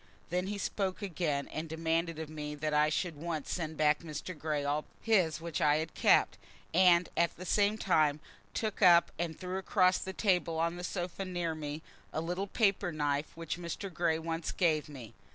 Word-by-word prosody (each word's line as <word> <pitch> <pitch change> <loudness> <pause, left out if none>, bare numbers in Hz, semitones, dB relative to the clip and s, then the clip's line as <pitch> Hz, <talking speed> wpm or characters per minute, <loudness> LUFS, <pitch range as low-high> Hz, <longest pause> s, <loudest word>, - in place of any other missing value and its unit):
Then 180 +1 0
he 205 +1 -3
spoke 195 0 -2
again 160 -6 -1
and 160 +1 -5
demanded 165 +1 -1
of 160 -1 -5
me 150 -1 -6
that 150 +1 -2
I 150 0 +4
should 170 +2 -1
at - - -14
once 160 -4 -3
send 160 -3 -3
back 150 -1 +3
to - - -15
Mr. 155 +4 -5
Grey 150 -1 -2
all 145 +1 +1
presents - - -28
of - - -24 0.3
his - - -7
which 165 -3 -3
I 150 -2 +5
had 155 +1 -2
kept, - - +3 0.3
and 180 0 +5
at 170 -1 +1
the 185 - -7
same 205 +2 +2
time 155 -7 +2 0.4
took 215 -2 -2
up 175 -3 +7
and 170 -2 -3
threw 185 +1 -3
across 185 -1 +3
the 190 - -4
table 180 -6 +1
on 165 +1 +1
to 175 - -8
the 175 - -6
sofa 180 +1 -3
near 175 -3 -2
me, 155 0 -5 0.3
a - - -2
little 180 +4 -2
paper 195 -5 +1
knife 145 0 -1
which 165 +1 -4
Mr. 175 +3 -5
Grey 160 -1 +1
once 165 0 -3
gave 155 -4 +1
me. 125 -7 -10
165 Hz, 210 wpm, -32 LUFS, 155-180 Hz, 0.4 s, up